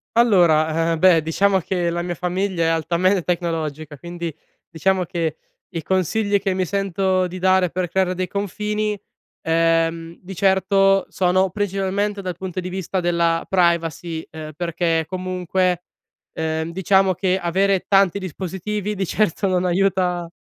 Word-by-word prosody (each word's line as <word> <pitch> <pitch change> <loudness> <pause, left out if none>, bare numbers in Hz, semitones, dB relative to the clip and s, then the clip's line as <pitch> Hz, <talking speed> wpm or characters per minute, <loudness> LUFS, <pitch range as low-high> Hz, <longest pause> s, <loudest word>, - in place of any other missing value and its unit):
Allora, 165 -7 +3
eh, 165 - 0
beh, 175 -3 +5
diciamo 195 +5 +2
che 175 0 -1
la 175 0 -2
mia 175 0 -3
famiglia 180 0 -1
è - - +2
altame 175 +3 +1
tecnologica, 160 -4 -3
quindi, 170 +1 -6 0.4
diciamo 185 +3 0
che 165 -2 -2 0.3
i 170 -3 -4
consigli 195 +5 +1
che 195 -1 -1
mi 185 0 0
sento 190 0 0
di 180 +1 -6
dare 185 -1 +3
per 180 0 -2
creare 190 0 +1
dei 185 0 -2
confini, 210 +1 -2 0.5
ehm, 165 0 +1
di 190 +1 -9
certo 195 0 +3
sono 185 +1 +2
principalmente 200 +1 -1
dal 180 -3 -5
punto 185 0 -5
di 180 - -4
vista 190 0 -3
della 170 -1 +1
privacy. 170 -2 0
Ehm, 155 -1 -8
perché 165 -1 0
comunque, 185 -1 -1 0.5
ehm, 160 0 -2
diciamo 190 +1 +2
che 185 +1 0
avere 190 +2 +1
tanti 195 -1 +3
dispositivi 190 +3 -4
di 195 -2 -3
certo 205 0 0
non 185 -1 +1
aiuta 180 -1 +1
180 Hz, 145 wpm, -21 LUFS, 170-190 Hz, 0.5 s, beh